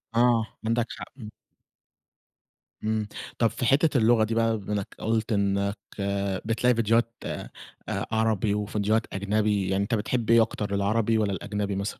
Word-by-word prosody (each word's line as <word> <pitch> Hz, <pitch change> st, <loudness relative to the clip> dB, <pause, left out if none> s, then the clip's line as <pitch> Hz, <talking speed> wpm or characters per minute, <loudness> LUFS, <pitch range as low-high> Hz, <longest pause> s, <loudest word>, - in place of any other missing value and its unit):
آه 120 Hz, -2 st, +4 dB, 0.2 s
عندَك 115 Hz, 0 st, +1 dB
حق، -, -, -6 dB
امم. 110 Hz, -4 st, -9 dB, 1.5 s
امم. 110 Hz, -1 st, 0 dB, 0.3 s
طب 115 Hz, -, +5 dB
في 125 Hz, -, -4 dB
حتّة 140 Hz, +3 st, +3 dB
اللغة 115 Hz, -1 st, +4 dB
دي 110 Hz, +1 st, -1 dB
بقى 115 Hz, -1 st, +2 dB
بما 105 Hz, 0 st, -5 dB
إنّك 100 Hz, -2 st, -3 dB
قلت 110 Hz, 0 st, -1 dB
إنّك 100 Hz, 0 st, 0 dB, 0.7 s
بتلاقي 115 Hz, +2 st, +2 dB
ڨيديوهات 115 Hz, 0 st, +2 dB
آآ، -, -, -5 dB, 0.6 s
عربي، 110 Hz, -2 st, +1 dB
وڨيديوهات 105 Hz, +1 st, 0 dB
أجنبي، 100 Hz, 0 st, 0 dB
يعني 95 Hz, +1 st, +1 dB
أنت 115 Hz, +4 st, 0 dB
بتحب 115 Hz, +2 st, -1 dB
إيه 115 Hz, 0 st, +7 dB
أكتر 105 Hz, -2 st, -1 dB
العربي 110 Hz, +3 st, +1 dB
والّا 105 Hz, -2 st, +1 dB
الأجنبي 100 Hz, +2 st, -3 dB
مثلًا؟ 100 Hz, +1 st, -3 dB
110 Hz, 150 wpm, -26 LUFS, 100-115 Hz, 1.5 s, إيه